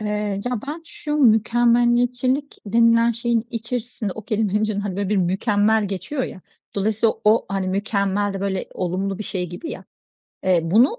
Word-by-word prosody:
Eee, 210 -1 -2
ya, 245 -3 -2
ben 315 +3 -5
şu 300 -2 -4
mükemmeliyetçilik 240 +2 +3
denilen 230 +2 +4
şeyin 235 0 0
içerisinde 235 -2 -4
o 220 - -7
kelimenin 210 -2 0
içinde, 215 -2 -1
hani, 200 -2 -4
böyle 200 -1 -1
bir 210 - +1
"mükemmel" 205 +3 +2
geçiyor 195 - -3
ya, - - -8 0.3
dolayısıyla 220 +2 +1
o 215 +2 +4
hani 195 -1 -1
"mükemmel" 200 0 0
de 195 - -5
böyle 195 -1 -2
olumlu 190 +2 -2
bir 215 - -5
şey 180 -3 -3
gibi 250 - -7
ya. - - -8 0.6
Eee, 185 -2 +4
bunu 230 - +3
215 Hz, 165 wpm, -22 LUFS, 195-235 Hz, 0.6 s, denilen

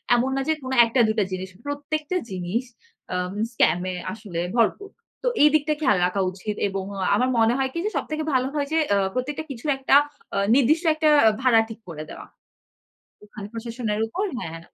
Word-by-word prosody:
এমন 245 +2 +1
না 270 - 0
যে 315 - +3
কোনো 260 0 -2
১ 230 - 0
টা 255 - +6
২ 220 - 0
টা 205 - +2
জিনিস। 185 0 -4 0.2
প্রত্যেকটা 300 +4 -3
জিনিস 185 +6 -2 0.5
অ্যা 180 - -1 0.3
স্কাম 205 -6 +3
এ - - -5 0.2
আসলে 205 -6 -5
ভরপুর। 245 - +1 0.3
তো - - 0 0.2
এই 300 - +8
দিকটা 305 0 +2
খেয়াল 205 -10 +3
রাখা 190 +2 0
উচিত। 200 +3 -5
এবং 195 -1 -3
অ্যা 190 -1 -1
আমার 250 +5 +2
মনে 225 +1 +4
হয় 265 -1 0
কি - - -3
যে, - - +1
সবথেকে 310 0 -3
ভালো 255 0 +2
হয় 285 -1 0
যে, 320 - +1
অ্যা 200 - +3
প্রত্যেকটা 280 +5 -3
কিছু 240 -1 -9
একটা 270 +1 +3 0.4
অ্যা 200 - 0
নির্দিষ্ট 290 +6 +3
একটা 310 0 +2 0.3
ভাড়া 250 -3 +5
ঠিক 225 - -9
করে 155 -2 -6
দেওয়া। - - -9 1.0
ওখানে 210 -1 -9
প্রশাসনের 230 -2 -3
উপর, 370 - -2
হ্যাঁ। 165 -6 -6
235 Hz, 195 wpm, -24 LUFS, 200-285 Hz, 1.0 s, এই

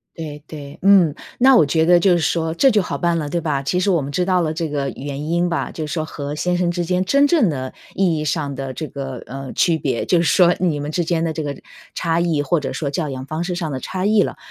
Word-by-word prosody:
对 150 -3 -7
对， 145 -2 -9
嗯。 190 -6 +5 0.2
那 260 +1 +6
我 - - +6
觉 160 +3 +1
得 175 0 +6
就 185 +1 +4
是 175 - +3
说 160 0 0
这 270 +10 +4
就 215 -4 +3
好 - - -4
办 170 -1 +1
了， 150 -2 -3
对 170 - -1
吧。 145 -4 -1
其 180 +6 -1
实 190 +2 +1
我 170 -5 +2
们 140 - -5
知 180 +5 0
道 185 -1 +2
了 160 -2 0
这 160 0 -3
个 140 -2 -2
原 145 +2 -5
因 175 +1 +1
吧， 170 - -2
就 155 -2 -5
是 150 - -6
说 155 -2 -1
和 145 -2 -6
先 180 +3 0
生 175 -1 +1
之 175 0 -2
间 180 +2 0
真 280 +8 +4
正 285 - +3
的 130 -4 -4 0.2
意 180 -4 +2
义 150 - -3
上 145 -2 -2
的 135 0 -5
这 155 - -5
个， 135 -3 -6
呃， 135 0 -7
区 165 -2 +2
别， 130 -6 -1
就 175 - +2
是 170 - +1
说 175 0 +4
你 160 -5 0
们 145 - -4
之 170 +2 -1
间 165 0 0
的 165 - 0
这 160 0 -4
个 145 -1 -3 0.4
差 165 -1 0
异 165 -4 +1
或 165 +5 +1
者 145 - -4
说 145 -3 -3
教 150 +2 -2
养 130 -1 -6
方 155 +4 -3
式 180 0 -3
上 170 -3 -3
的 130 - -3
差 185 +7 -4
异 210 -1 +4
了。 - - -3
165 Hz, 300 characters per minute, -20 LUFS, 145-175 Hz, 0.4 s, 那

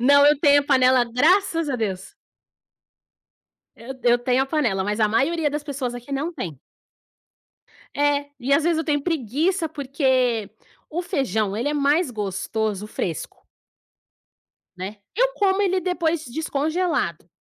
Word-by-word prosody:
Não, 285 +3 +6
eu 295 -1 +5
tenho 285 -1 +5
a 280 - -6
panela, 255 -3 +4
graças 325 - +2
a 265 - -1
Deus. 195 -5 -4 1.6
Eu 235 +4 -8
eu 240 0 +4
tenho 250 +2 +1
a 270 - -2
panela, 235 -11 0
mas 210 +2 -2
a 215 - +4
maioria 305 +8 +1
das 295 0 -4
pessoas 265 -4 -4
aqui 245 +3 -9
não 295 +5 -2
tem. 165 - -6 1.4
É, 285 0 +1
e 260 +3 -1
às 290 - +3
vezes 335 -1 +2
eu 320 - -1
tenho 290 -3 0
preguiça, 325 - 0
porque 260 -6 0 0.4
o 345 +3 -3
feijão 255 - -1
ele 240 +5 -1
é 295 - -1
mais 290 +1 +2
gostoso 210 0 -3
fresco. 170 -7 -5 1.3
Né? 190 +4 -6 0.2
Eu - - +3
como 395 -1 +2
ele 375 -1 +1
depois 340 -3 -1
descongelado, 310 - -2
280 Hz, 145 wpm, -23 LUFS, 235-320 Hz, 1.6 s, Não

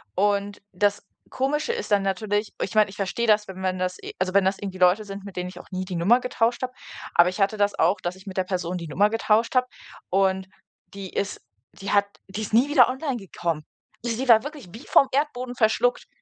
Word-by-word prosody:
Und 200 +1 0
das 200 +2 0 0.2
Komische 295 - -1
ist 460 - -5
dann 200 -1 +4
natürlich 205 +2 -1
ich 190 - -2
meine, 215 -1 +5
ich 195 - -11
verstehe 210 +4 -1
das, 210 -1 +3
wenn 190 0 -8
man 185 -1 -1
das 185 0 -2
äh, - - -8
also 185 0 -1
wenn 200 -1 +4
das 190 +1 +1
irgendwie 195 -2 -6
Leute 180 +4 +4
sind, 200 0 -8
mit 200 - -9
denen 180 0 -3
ich 180 -1 -11
auch - - -14
nie 185 0 -3
die 180 -1 -5
Nummer 220 +9 +4
getauscht 235 -1 0
habe, 255 - -2 0.4
aber 175 - +7
ich 185 +3 -5
hatte 200 +2 +2
das 205 0 +1
auch, 180 +4 +3
dass 175 +1 -3
ich 190 +1 -17
mit 190 -1 -7
der 185 - +1
Person 180 -1 -2
die 170 -2 -6
Nummer 200 +8 +2
getauscht 225 +1 +1
habe 255 0 +3 0.4
und 190 0 +1 0.5
die 195 -2 -7
ist 200 - -3 0.3
die 195 - -6
hat 200 0 +4 0.2
die 195 +3 -5
ist 215 - -7
nie 250 +6 +4
wieder 295 - +6
online 265 0 -2
gekommen. 170 -6 -4 0.4
Sie 240 +2 -2
war 225 -1 +7
wirklich 295 - -8
wie 230 - -10
vom 275 - +5
Erdboden 255 -3 -1
verschluckt. 240 +2 +1
200 Hz, 230 wpm, -24 LUFS, 185-230 Hz, 0.5 s, aber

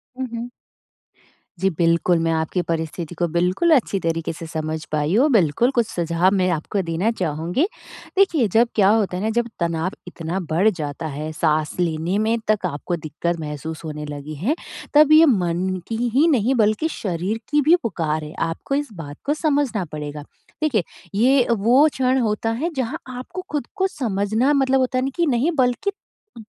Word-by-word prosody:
उहुँ। 240 -2 -4 1.1
जी 195 - +2
बिल्कुल, 170 +1 +3
मैं 165 0 +1
आपकी 160 +3 0
परिस्थिति 165 0 -4
को 175 +1 0
बिल्कुल 180 - +1
अच्छी 220 -7 +1
तरीके 165 -1 -2
से 165 - -8
समझ 155 0 -3
पाई 150 +2 0
हूँ। 270 +7 +4
बिल्कुल, 215 - +3
कुछ 235 -2 +3
सुझाव 170 -2 +1
मैं 185 -2 +2
आपको 195 +6 -2
देना 170 +7 +1
चाहूँगी। 175 - -1 0.5
देखिए 330 - +4
जब 235 +2 +5
क्या 200 -3 +5
होता 210 -4 +2
है 185 - -3
ना 220 - +1
जब 240 -1 +2
तनाव 170 +1 -1 0.2
इतना 175 +1 -4
बढ़ 185 +7 +4
जाता 160 -4 -4
है, 150 +1 -5
साँस 155 -1 0
लेने 170 +2 0
में 220 +2 +1
तक 210 -3 +1
आपको 175 +1 -2
दिक़्क़त 170 +2 -3
महसूस 155 +1 -6
होने 150 -1 -5
लगी 145 +1 -7
है 210 - 0 0.4
तब 300 0 +6
ये 315 +1 +8
मन 180 - +1 0.2
की 225 - -3 0.2
ही 300 +5 +5
नहीं 260 -4 +2
बल्कि 215 +6 +2
शरीर 195 - -3
की 295 0 +3
भी 310 +5 +6
पुकार 160 -8 -1
है। 150 +1 -8 0.2
आपको 175 +11 -3
इस 285 -5 -2
बात 150 -5 -8
को 290 - +2
समझना 285 - 0
पड़ेगा। 150 -1 -6 0.4
देखिए, 260 - +2 0.3
ये 250 +4 +4
वो 235 +7 +5
क्षण 260 0 +1
होता 225 -1 0
है 335 - 0
जहाँ 260 +3 -2
आपको 255 +9 -6
ख़ुद 295 -5 -2
को 380 - +2
समझना 225 - 0
मतलब 270 -1 +3
होता 255 0 0
है - - +2
नहीं 270 - -1
कि 345 - +2
नहीं 275 +3 +2
बल्कि 250 - +1 0.5
अ, - - -8
195 Hz, 180 wpm, -22 LUFS, 165-255 Hz, 1.1 s, ये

